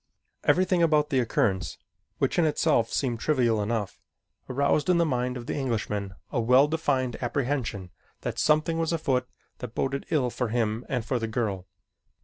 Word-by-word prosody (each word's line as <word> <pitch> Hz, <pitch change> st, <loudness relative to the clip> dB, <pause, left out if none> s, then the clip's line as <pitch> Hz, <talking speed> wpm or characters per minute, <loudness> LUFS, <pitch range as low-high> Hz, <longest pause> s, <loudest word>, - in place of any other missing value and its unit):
Everything 185 Hz, -1 st, +3 dB
about 155 Hz, -2 st, +3 dB
the 135 Hz, -, +3 dB
occurrence, 95 Hz, -7 st, 0 dB, 0.4 s
which -, -, +1 dB
in -, -, +4 dB
itself 150 Hz, -6 st, +2 dB
seemed 120 Hz, -4 st, -1 dB
trivial 120 Hz, -6 st, +2 dB
enough, 105 Hz, -2 st, -2 dB, 0.5 s
aroused 140 Hz, +5 st, +1 dB
in 180 Hz, -, +5 dB
the 170 Hz, -, +3 dB
mind 125 Hz, -3 st, -1 dB
of 120 Hz, -, -7 dB
the -, -, -3 dB
Englishman 105 Hz, -7 st, -2 dB, 0.2 s
a 120 Hz, -, 0 dB
well 125 Hz, +5 st, +5 dB
defined 140 Hz, -6 st, 0 dB
apprehension 120 Hz, -7 st, -2 dB, 0.3 s
that -, -, -4 dB
something 155 Hz, +2 st, +2 dB
was 165 Hz, 0 st, 0 dB
afoot 135 Hz, -6 st, 0 dB, 0.3 s
that 120 Hz, -2 st, -7 dB
boded 135 Hz, +1 st, -2 dB
ill 130 Hz, -6 st, +1 dB
for 125 Hz, -, -2 dB
him 115 Hz, 0 st, -1 dB
and 125 Hz, -5 st, -1 dB
for 125 Hz, +1 st, 0 dB
the 115 Hz, -, -2 dB
girl. 105 Hz, -5 st, -2 dB
125 Hz, 165 wpm, -27 LUFS, 115-150 Hz, 0.5 s, in